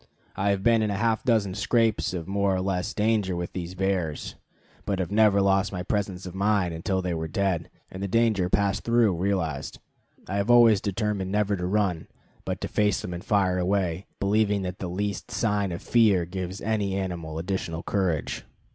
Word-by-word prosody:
I 100 +1 0
have 100 -1 0
been 115 0 +4
in 110 - +1
half 110 +2 +1
a - - -16
dozen 105 -6 +2
scrapes 110 +2 +1
of 90 -2 -5
more 100 0 +1
or - - -1
less 90 -2 -1
danger 105 -4 +1
with 85 0 -4
these 90 0 -5
bears, 95 -5 -1 0.5
but 100 - -1
have 95 0 -3
never 105 -2 +4
lost 95 0 +2
my 90 -2 -4
presence 95 -2 -2
of 90 - -7
mind 100 -2 +1
until 95 +3 -1
they 90 -1 -1
were 80 -1 -3
dead, 90 -1 -1 0.2
and 95 - -7
the 100 - -1
danger 110 -4 +2
passed 100 +1 +1
through 115 -5 +3
realized. 85 -6 -2 0.5
I 100 - -2
have 100 +3 -1
always 115 -4 +6
determined 100 -2 -2
never 105 0 +1
to 90 -1 -3
run, 95 -4 0 0.4
but - - -3
to - - -2
face 105 -2 +1
them 90 - -5
and 85 - -6
fire 95 -3 +2
away, 90 -1 0
believing 100 0 +2
that 90 0 -5
the 95 - -3
least 100 +3 -3
sign 105 -4 0
of 85 +4 -6
fear 105 -7 +4
gives 95 +1 -5
any 105 -3 -1
animal 85 -5 -4
additional 85 -1 -3
courage. 95 -7 -1
95 Hz, 190 wpm, -26 LUFS, 90-105 Hz, 0.5 s, always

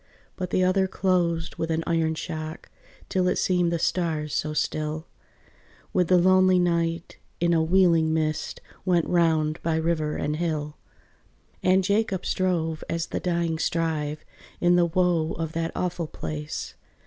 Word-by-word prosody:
But 180 -2 -4
the 185 - +2
other 190 +1 +3
closed 175 -4 0
with 165 - -2
an 165 0 0
iron 165 -1 +1
shock, 155 0 -6 0.4
Till 185 -1 +1
it - - +2
seemed 180 -2 +1
the 170 - +1
stars 160 -3 -1
so 155 - -1
still, 155 +1 -2 0.9
With 180 -2 +2
the 185 - +5
lonely 185 +1 +5
night, 170 -1 0 0.2
in 170 0 +2
a 165 - +3
wheeling 165 -2 +3
mist, 155 -2 -1 0.2
Went 175 -3 +2
round 160 -2 +1
by 165 -1 0
river 160 -2 0
and 150 +1 -2
hill. 155 -3 -2 0.9
And 185 +1 +3
Jacob 200 -1 0
strove 165 -4 0
as 165 0 -1
the - - 0
dying 170 -2 -1
strive, 155 -3 -1 0.3
In 175 0 +4
the 175 -1 +4
woe 170 -2 +1
of 160 -1 -4
that 165 0 -2
awful 175 -2 -2
place. 75 - -5
165 Hz, 150 wpm, -25 LUFS, 160-180 Hz, 0.9 s, the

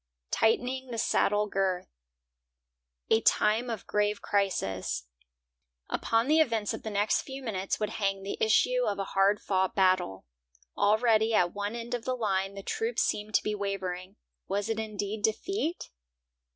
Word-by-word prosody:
TIGHTENING 250 +3 +1
THE 235 - -4
SADDLE 210 -1 +2
GIRTH 190 -2 0 1.2
A 225 - +5
time 220 +3 +3
of 225 -5 -4
grave 210 0 0
crisis; 95 - -1 0.9
upon 230 +2 +1
the 310 +2 +4
events 225 -8 +1
of 220 - -6
the 220 - -5
next 205 0 +1
few 270 0 -8
minutes 195 -5 -2
would 210 0 -1
hang 195 -2 -1
the 195 - -3
issue 250 +3 +3
of 205 - -1
a 200 - -1
hard 195 +1 +4
fought 190 -1 0
battle. 185 - +2 0.5
Already 220 +1 +3
at 175 -3 +3
one 205 +2 -3
end 235 0 -5
of 240 -2 -2
the 255 - 0
line 195 -4 -1
the 195 - -7
troops 450 - -1
seemed 210 0 -2
to - - +4
be 210 - -1
wavering. 195 -2 -4 0.3
Was 200 +2 -1
it 225 -1 -1
indeed 210 -1 -4
defeat? 345 - -1
210 Hz, 155 wpm, -29 LUFS, 195-230 Hz, 1.2 s, A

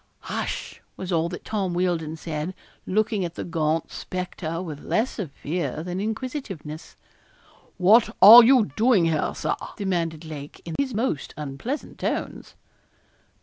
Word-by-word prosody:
'Hush!'was 185 0 -5
all 165 0 +1
that 175 - -8
Tom 195 -5 -2
Wealdon 170 -3 -1
said, 160 +2 -4 0.3
looking 210 0 +1
at 170 -1 -4
the - - -4
gaunt 160 -1 -1
spectre 175 -2 -4
with 155 -5 -6
less 230 +2 -1
of 185 -7 -3
fear 155 +2 -3
than 180 +1 -4
inquisitiveness. 215 - -5 0.8
'What 210 +5 +5
are 230 +5 +12
you 235 - +5
doing 220 -6 +4
here, 160 -2 0
Sir?' - - -1 0.2
demanded 170 -5 -2
Lake, 150 -2 -8
in 165 - -5
his 265 -5 -1
most 220 - -2
unpleasant 150 - -5
tones. - - -3
180 Hz, 135 wpm, -24 LUFS, 160-215 Hz, 0.8 s, are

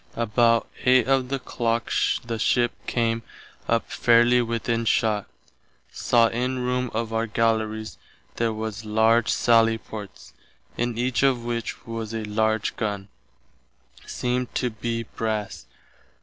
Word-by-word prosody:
About 115 0 +2 0.2
8 130 -1 +4
of 135 -2 +2
the 135 - 0
clock 120 -2 -2 0.3
the 115 -1 -4
ship 120 +2 +2 0.2
came 115 -1 0 0.5
up 115 0 0
fairely 120 +1 +4
within 115 0 -1
shott. 110 -2 +1 0.6
Saw 120 -1 +3
in 125 +2 -2
room 125 0 -1
of 115 0 -3
our 115 +1 0
Gallerys 110 0 -1 0.4
there 115 -1 +1
was 110 0 -5
large 110 +1 +3
sally 115 -1 +4
ports, 105 -3 -10 0.4
in 120 -1 -2
each 125 +1 0
of 130 -4 +2
which 120 0 -4
was 115 -1 -5
a 110 - -3
large 110 0 0
gunn, 100 -2 -3 0.9
seemed 125 0 -3
to 125 -2 0
be 115 +1 -3
brass. 110 -2 -4
115 Hz, 130 wpm, -24 LUFS, 110-120 Hz, 0.9 s, 8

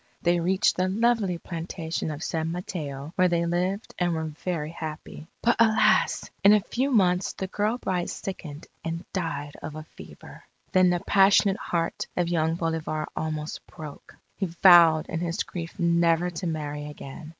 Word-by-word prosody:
They 175 0 +3
reached 185 +3 +2
the 185 0 +2
lovely 215 -3 +1
plantation 165 -1 -4
of 150 +1 -5
San 160 -1 -2
Mateo, 155 -4 -5
where 185 -1 +5
they 170 -1 +1
lived 180 +4 -1
and 175 -1 +1
were 160 - -2
very 160 0 -4
happy. 155 -1 -7 0.2
But, 235 - +3
alas! 220 -1 +3 0.2
in 200 +1 +8
a 210 - +6
few 250 +6 -1
months 185 -7 +2
the 190 - -4
girl 210 +4 -1
bride 180 -7 -2
sickened 160 -5 -7 0.2
and 165 +2 -4
died 145 -6 -3
of 155 -1 -7
a 155 - -6
fever. - - -13 0.3
Then 185 -1 +5
the 175 -1 0
passionate 195 0 +4
heart 170 -8 -2
of 175 -1 +1
young 165 -1 +1
Bolivar 160 -2 -2
almost 155 -1 -3
broke. 155 -4 -11 0.2
He 195 - -1
vowed 170 -2 +6
in 165 - -3
his 170 +3 -1
grief 170 0 -7
never 170 0 +2
to 175 +1 -4
marry 150 -2 -4
again. 150 +1 -9
170 Hz, 165 wpm, -26 LUFS, 160-185 Hz, 0.3 s, in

